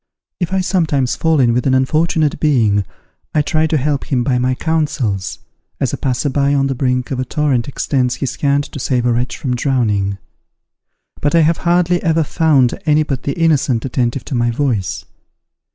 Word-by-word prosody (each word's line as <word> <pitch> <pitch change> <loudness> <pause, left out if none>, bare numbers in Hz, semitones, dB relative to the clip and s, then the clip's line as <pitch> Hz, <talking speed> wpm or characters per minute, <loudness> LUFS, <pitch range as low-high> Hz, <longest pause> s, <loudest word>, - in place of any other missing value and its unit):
If 175 -1 -2
I 190 0 +1
sometimes 155 -9 0
fall 160 -2 +1
in 120 -3 +3
with 125 +2 0
an 130 - +3
unfortunate 155 +3 +1
being, 110 -10 +2 0.5
I 150 - +3
try 155 +1 +1
to 155 - +1
help 140 0 -1
him 125 -4 0
by 125 0 +1
my 130 +1 +1
counsels, 135 - -1 0.4
as - - -1
a - - -2
passer 130 +2 -1
by 140 +1 +1
on 135 -1 +2
the 135 - 0
brink 125 -1 -1
of 130 - -2
a - - 0
torrent 130 -3 0
extends 130 -2 -1
his 135 - -3
hand 140 0 +1
to 140 - -9
save 125 -1 0
a 120 - +2
wretch 125 +1 -2
from 125 -3 -2
drowning. 105 -7 0 1.0
But 145 +3 0
I 165 - +5
have 160 +1 +2
hardly 175 0 +2
ever 165 -2 +2
found 145 -6 +2
any 150 0 +4
but 135 -4 -3
the 140 - -2
innocent 140 -8 +2
attentive 125 0 -1
to - - -6
my 120 -1 +1
voice. 120 -6 -2
135 Hz, 190 wpm, -17 LUFS, 125-155 Hz, 1.0 s, I